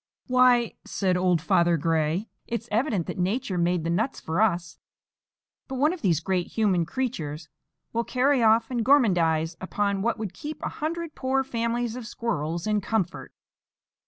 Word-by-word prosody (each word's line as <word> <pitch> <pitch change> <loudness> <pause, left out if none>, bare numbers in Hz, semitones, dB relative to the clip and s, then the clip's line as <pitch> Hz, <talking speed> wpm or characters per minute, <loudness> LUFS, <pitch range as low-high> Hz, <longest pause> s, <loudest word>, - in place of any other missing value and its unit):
"Why!" 250 -2 +4
said 185 -2 0
old 180 -3 +2
Father 170 0 +3
Gray, 160 +5 0 0.2
"it's 235 0 -4
evident 215 - +1
that - - -6
Nature 195 +1 -1
made 175 -1 +1
the 165 - -1
nuts 215 +10 -1
for 165 +5 -1
us; 175 -5 0 0.9
but 265 - -5
one 295 +6 +2
of 365 - -8
these 170 -6 +2
great 185 0 -1
human 190 -7 +1
creatures 165 - -4 0.4
will 235 +1 +1
carry 260 +2 +2
off 225 +1 +4
and 240 -2 0
gormandize 175 - +3
upon 200 +1 -1
what 235 +2 0
would 215 -4 -5
keep 305 0 -7
a - - -1
hundred 330 +1 -4
poor 265 0 0
families 235 -2 -2
of 245 -3 -7
squirrels 170 -9 -3
in 210 -1 +1
comfort." 190 -3 -2
215 Hz, 160 wpm, -26 LUFS, 175-245 Hz, 0.9 s, Why